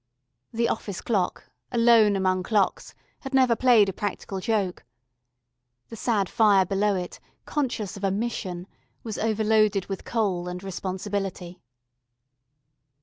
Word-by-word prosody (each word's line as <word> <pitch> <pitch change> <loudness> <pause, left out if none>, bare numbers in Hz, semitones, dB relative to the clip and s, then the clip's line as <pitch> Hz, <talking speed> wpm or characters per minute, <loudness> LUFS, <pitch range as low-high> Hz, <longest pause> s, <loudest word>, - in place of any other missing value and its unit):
The 235 0 0
office 200 -5 -3
clock, 195 -6 -2 0.2
alone 230 -4 +5
among 185 -1 +1
clocks, 205 +1 0 0.2
had 270 0 -5
never 255 -3 +4
played 235 -4 +5
a 195 - -2
practical 200 -1 -4
joke. 195 -3 -1 1.1
The 230 - -8
sad 215 -3 0
fire 200 -3 +4
below 200 +2 +1
it, 180 -1 -5 0.3
conscious 240 -9 -2
of 200 - -10
a 195 - +2
Mission, 190 -4 -3 0.4
was 220 -3 -5
overloaded 215 -2 +2
with 195 -1 -6
coal 195 -6 -1
and 180 +1 -6
responsibility. 190 -1 -4
205 Hz, 125 wpm, -25 LUFS, 190-225 Hz, 1.1 s, alone